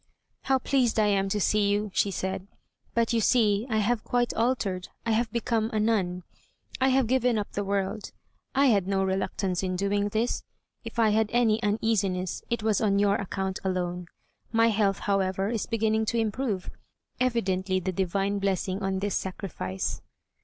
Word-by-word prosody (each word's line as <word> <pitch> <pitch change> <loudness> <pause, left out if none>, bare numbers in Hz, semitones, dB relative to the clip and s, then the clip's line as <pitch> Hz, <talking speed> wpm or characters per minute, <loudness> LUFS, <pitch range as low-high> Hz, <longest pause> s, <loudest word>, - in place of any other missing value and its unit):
"How 265 -1 +3
pleased 250 -3 +1
I 215 - +4
am 195 -1 +2
to 210 - 0
see 205 +1 +2
you," 205 0 0
she 205 - +2
said, 190 0 -3 0.5
"but 230 0 +2
you 230 - +2
see 215 -1 +3
I 220 - +1
have 215 +2 +1
quite 245 -1 0
altered, 215 -6 0 0.2
I 230 - +1
have 220 0 +1
become 230 -1 0
a 220 - 0
nun. 190 -5 0 0.6
I 260 - +3
have 265 -1 +3
given 250 -1 +2
up 205 - -3
the 205 - -2
world. 200 +1 -2 0.4
I 275 +1 +4
had 200 -8 +3
no 195 -1 +1
reluctance 190 -1 -1
in 185 -1 -2
doing 200 +2 0
this. 220 +3 -1 0.4
If - - -8
I 225 -2 +4
had 220 0 +2
any 230 -2 +3
uneasiness, 205 -4 0
it 235 -2 -1
was 215 -2 +2
on 200 -2 +2
your 200 0 +3
account 190 -1 -3
alone. 180 -2 -2 0.4
My 225 0 +4
health, 200 -2 +2
however, 195 0 0
is 225 -2 -2
beginning 220 -1 +1
to 235 - -1
improve; 220 -3 -1 0.5
evidently 190 -7 +1
the 185 +1 -2
divine 195 +2 0
blessing 195 0 -1
on 195 0 -1
this 205 -1 -1
sacrifice." 175 - -3
205 Hz, 175 wpm, -27 LUFS, 190-225 Hz, 0.6 s, I